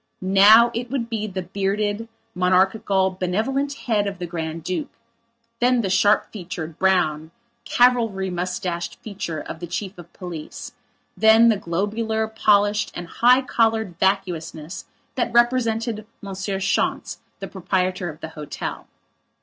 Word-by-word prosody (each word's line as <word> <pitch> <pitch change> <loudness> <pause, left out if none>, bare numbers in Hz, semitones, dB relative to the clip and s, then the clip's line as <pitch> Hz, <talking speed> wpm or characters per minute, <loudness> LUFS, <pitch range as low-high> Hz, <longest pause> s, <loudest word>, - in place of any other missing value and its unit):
Now 205 +5 +7
it 240 +1 -4
would 240 -3 -3
be 215 -1 -2
the 190 -2 -4
bearded, 205 +4 -2 0.3
monarchical, 190 +1 +2
benevolent 245 +10 0
head 210 -4 +1
of 200 -1 -4
the 175 - -4
Grand 165 -1 -5
Duke; 185 - -3 0.7
then 245 0 +3
the 195 -4 -2
sharp 205 +2 +3
featured, 170 -5 -7
brown, 160 -5 +1 0.4
cavalry 225 -6 +2
moustached 180 -1 -3
feature 195 -7 -5
of 160 - -7
the 175 - -6
chief 190 +3 -4
of 170 0 -12
police; 170 -4 -8 0.4
then 225 +1 +6
the 220 - +4
globular, 220 +5 -1
polished 210 -1 +2
and 175 -1 -6
high 250 +8 +4
collared 220 -7 0
vacuousness 180 -3 -2 0.3
that 255 - -1
represented 230 -2 +1
Monsieur 195 -1 -4
Schontz, 195 0 -1 0.2
the - - -6
proprietor 185 -1 -1
of 155 0 -11
the 160 - -6
hotel. 150 -2 -6
195 Hz, 135 wpm, -22 LUFS, 180-220 Hz, 0.7 s, Now